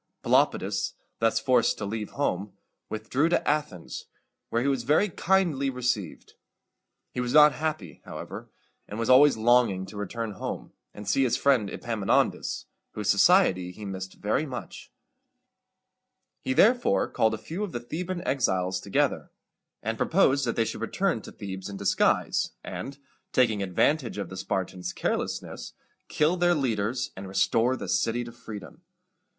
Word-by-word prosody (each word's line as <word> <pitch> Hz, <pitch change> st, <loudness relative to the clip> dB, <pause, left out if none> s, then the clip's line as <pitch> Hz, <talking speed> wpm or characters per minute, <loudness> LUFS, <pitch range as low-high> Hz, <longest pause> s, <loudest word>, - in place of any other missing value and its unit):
Pelopidas, -, -, +2 dB, 0.3 s
thus 115 Hz, 0 st, +2 dB
forced 125 Hz, +1 st, +2 dB
to 105 Hz, -, -4 dB
leave 105 Hz, +1 st, -4 dB
home, 100 Hz, -8 st, -1 dB, 0.4 s
withdrew 120 Hz, +9 st, 0 dB
to 175 Hz, -, +1 dB
Athens, 145 Hz, -, -2 dB, 0.4 s
where 115 Hz, +1 st, 0 dB
he -, -, 0 dB
was 135 Hz, -3 st, +1 dB
very 150 Hz, -, +3 dB
kindly 170 Hz, -7 st, +1 dB
received. 125 Hz, -9 st, -3 dB, 0.8 s
He -, -, -3 dB
was 125 Hz, 0 st, -1 dB
not 150 Hz, 0 st, +9 dB
happy, 155 Hz, +1 st, -4 dB
however, -, -, -8 dB, 0.4 s
and 105 Hz, -, -7 dB
was 115 Hz, +2 st, +1 dB
always 140 Hz, 0 st, +7 dB
longing 115 Hz, -5 st, +3 dB
to 100 Hz, +2 st, -10 dB
return 105 Hz, +2 st, -4 dB
home, 100 Hz, -, -6 dB, 0.2 s
and 105 Hz, -1 st, -10 dB
see 135 Hz, -, +2 dB
his 125 Hz, -3 st, +2 dB
friend 130 Hz, -8 st, +3 dB
Epaminondas, 110 Hz, -3 st, 0 dB, 0.3 s
whose 105 Hz, -2 st, +1 dB
society 100 Hz, -, +4 dB
he 105 Hz, +3 st, -9 dB
missed 95 Hz, -1 st, -6 dB
very 110 Hz, +9 st, -1 dB
much. 125 Hz, -3 st, -8 dB, 1.5 s
He 130 Hz, -, -1 dB
therefore 240 Hz, -, +4 dB
called 110 Hz, 0 st, +1 dB
a -, -, -7 dB
few 165 Hz, -, -5 dB
of 205 Hz, -, -4 dB
the 120 Hz, -, -3 dB
Theban 175 Hz, +8 st, -5 dB
exiles 95 Hz, -8 st, +1 dB
together, 100 Hz, +1 st, 0 dB, 0.5 s
and 110 Hz, +1 st, -3 dB
proposed 140 Hz, -6 st, +3 dB
that 115 Hz, -, 0 dB
they 115 Hz, -, +2 dB
should -, -, -5 dB
return -, -, 0 dB
to -, -, -10 dB
Thebes 95 Hz, -1 st, -7 dB
in 100 Hz, -, -6 dB
disguise, 100 Hz, -1 st, +1 dB
and, 135 Hz, 0 st, -6 dB, 0.3 s
taking 115 Hz, -5 st, +2 dB
advantage 115 Hz, -, +1 dB
of 100 Hz, -4 st, -4 dB
the 95 Hz, -, -8 dB
Spartans' 90 Hz, -1 st, -3 dB
carelessness, -, -, -3 dB, 0.3 s
kill 155 Hz, +4 st, +2 dB
their 175 Hz, 0 st, +3 dB
leaders, 120 Hz, -4 st, -1 dB
and 95 Hz, +1 st, -7 dB
restore 115 Hz, +6 st, +2 dB
the -, -, -6 dB
city 115 Hz, +5 st, +1 dB
to 120 Hz, -, -8 dB
freedom. 115 Hz, +6 st, -10 dB
115 Hz, 150 wpm, -27 LUFS, 100-140 Hz, 1.5 s, not